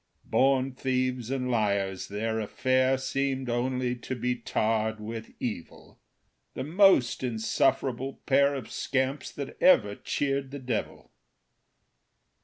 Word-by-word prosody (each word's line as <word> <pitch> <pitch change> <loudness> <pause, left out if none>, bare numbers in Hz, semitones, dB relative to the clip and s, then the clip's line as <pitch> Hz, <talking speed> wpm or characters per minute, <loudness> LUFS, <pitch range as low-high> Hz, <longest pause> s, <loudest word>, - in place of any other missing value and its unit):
Born 135 0 +2
thieves 130 -2 -1
and 130 -1 -1
liars, 100 -4 0
their 110 +2 -2
affair 130 +4 +1
Seemed 135 -1 -2
only 125 +1 0
to 130 +1 -5
be 125 +1 -1
tarred 110 -2 -1
with 110 +1 -7
evil 105 -9 -6 0.6
The 130 - -3
most 170 -4 +4
insufferable 125 +2 0
pair 140 +1 +4
Of 130 -5 -7
scamps 135 +1 -1
that 140 -2 -7
ever 105 - +5
cheered 140 +4 -2
the 140 - -6
devil. 125 -4 -4
130 Hz, 115 wpm, -28 LUFS, 115-135 Hz, 0.6 s, ever